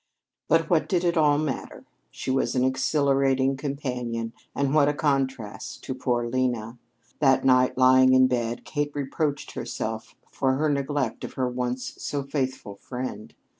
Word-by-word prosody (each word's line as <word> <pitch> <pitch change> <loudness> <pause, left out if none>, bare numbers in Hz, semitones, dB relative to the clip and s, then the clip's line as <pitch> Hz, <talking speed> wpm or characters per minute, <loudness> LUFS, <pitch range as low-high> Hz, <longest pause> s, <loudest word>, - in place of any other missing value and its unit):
But 165 0 +3
what 165 -2 +2
did 180 -3 +1
it 175 0 +1
all 150 -3 +4
matter? 150 -3 -4 0.2
She - - -4
was 135 0 0
an 125 - +2
exhilarating 135 0 +2
companion 125 -5 -4 0.2
and 140 0 0
what 145 -2 +5
a 145 - -1
contrast 135 -7 -2
to 130 - -4
poor 125 -2 -1
Lena! 120 -2 -1 0.4
That 135 -3 +3
night, 130 -1 +4
lying 130 0 +6
in 130 0 +6
bed, 120 -2 -1
Kate 145 -1 -2
reproached 145 +1 -2
herself 110 0 -5 0.2
for 130 -1 +1
her 150 +3 +1
neglect 140 -3 -1
of - - -6
her 130 -1 -1
once 125 0 -3
so 145 -1 -3
faithful 130 -7 -3
friend. 125 -3 -6
130 Hz, 155 wpm, -25 LUFS, 125-145 Hz, 0.4 s, lying